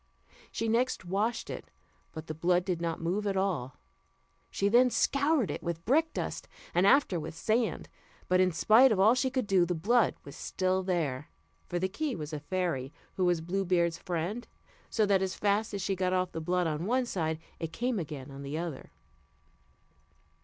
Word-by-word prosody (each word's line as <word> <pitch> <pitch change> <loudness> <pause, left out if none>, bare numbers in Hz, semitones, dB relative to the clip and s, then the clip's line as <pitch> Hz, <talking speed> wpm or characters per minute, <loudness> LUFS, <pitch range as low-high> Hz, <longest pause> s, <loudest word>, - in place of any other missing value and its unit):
She 225 - -2
next 235 -2 +1
washed 210 +6 -1
it, - - -7 0.4
but 160 0 -8
the 155 - -5
blood 175 +3 +1
did 180 -3 -2
not 165 -1 -2
move 200 +5 -1
at 195 -1 0
all. 165 -10 -1 0.7
She 200 - 0
then 245 +4 +5
scoured 280 -1 +2
it - - -5
with 170 -1 -4
brickdust, 315 +7 0 0.3
and 180 +3 +4
after 200 -7 +4
with 155 - -6
sand, 225 +6 0 0.4
but 185 0 +3
in 185 0 +4
spite 225 +9 +5
of 205 - +1
all 215 +4 +6
she 260 +1 +1
could 260 -2 -1
do, 195 -3 +3
the 175 +1 -1
blood 215 +6 +2
was 140 - -10
still 185 0 -1
there; 155 -7 -2 0.4
for 175 - -2
the 185 +2 0
key 265 +7 -3
was 155 -2 -6
a 150 - -3
fairy 150 -5 -2 0.2
who 185 - 0
was 175 -2 +2
Blue 190 +4 -1
Beard's 170 -2 +1
friend; 180 +7 -3 0.4
so 220 - +2
that 200 -2 +3
as 190 -1 -1
fast 205 +1 +1
as 200 -2 -3
she 195 - 0
got 185 0 0
off 185 -1 0
the 160 - -5
blood 180 +2 0
on 160 +2 -2
one 255 +2 +2
side, 160 -8 -2 0.2
it 165 -1 -4
came 240 +4 -1
again 145 -4 -6
on 135 0 -9
the 140 +2 -4
other. 165 -4 -5
185 Hz, 190 wpm, -30 LUFS, 165-215 Hz, 0.7 s, all